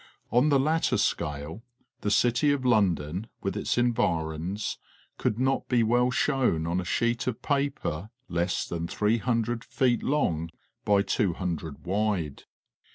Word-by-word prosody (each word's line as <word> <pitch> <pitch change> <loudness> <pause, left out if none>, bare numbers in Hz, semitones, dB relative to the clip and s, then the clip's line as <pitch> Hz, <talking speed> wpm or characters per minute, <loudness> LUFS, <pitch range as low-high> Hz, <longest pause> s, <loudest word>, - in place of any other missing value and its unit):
253 - - +1
On 145 +5 +3
the 140 -2 +3
latter 165 +1 +2
scale 75 +6 -2 0.4
the'city 120 +7 +3
of 140 -2 -1
London 95 -5 +1 0.2
with - - -1
its - - -1
environs 95 -5 0 0.4
could 105 - 0
not 135 +2 0
be 120 -2 +3
well 120 +2 +3
shown 125 -10 +1
on 85 +2 0
a - - -5
sheet 120 +7 0
of 120 -3 -1
paper 140 - -1 0.2
less 85 +2 -1
than 85 -1 -3
300 115 +3 0
feet 125 -3 +1
long 85 - 0 0.4
by 100 -1 +4
200 85 -6 -2
wide. 95 -6 -1
105 Hz, 135 wpm, -27 LUFS, 85-125 Hz, 0.4 s, by